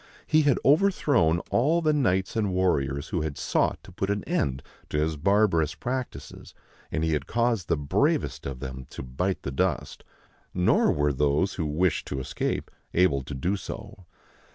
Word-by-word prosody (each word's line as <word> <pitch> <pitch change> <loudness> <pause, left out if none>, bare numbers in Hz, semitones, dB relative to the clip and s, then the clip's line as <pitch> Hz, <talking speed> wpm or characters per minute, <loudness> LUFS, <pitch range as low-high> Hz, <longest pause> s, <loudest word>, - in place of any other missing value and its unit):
He 155 - +4
had 145 -4 +3
overthrown 140 - +3
all 150 +8 +3
the 155 -2 +2
knights 95 -10 +1
and 105 -4 0
warriors 75 -6 0
who 90 -5 -1
had 75 -2 -3
sought - - +1
to - - -13
put 95 +2 -3
an 100 -1 -1
end 70 -1 -1 0.3
to - - -2
his 80 +1 +1
bar 100 +8 +3
barous 80 -4 -1
practices, 130 +4 -5 0.4
and 80 - -1
he 80 -1 +1
had 75 - -2
caused 115 -5 0
the 80 - +1
bravest 70 -1 0
of 65 -2 -6
them 65 -1 -6
to - - -7
bite 90 +10 -2
the 70 - -3
dust. 65 - -1 0.5
Nor 90 0 +3
were 75 0 +1
those 75 +7 +1
who 80 -4 -2
wished 80 +2 0
to 70 - -3
escape 65 - -3 0.2
able 80 -6 +3
to 65 +2 -7
do 90 +10 0
so. 100 -1 -8
85 Hz, 175 wpm, -26 LUFS, 75-105 Hz, 0.5 s, He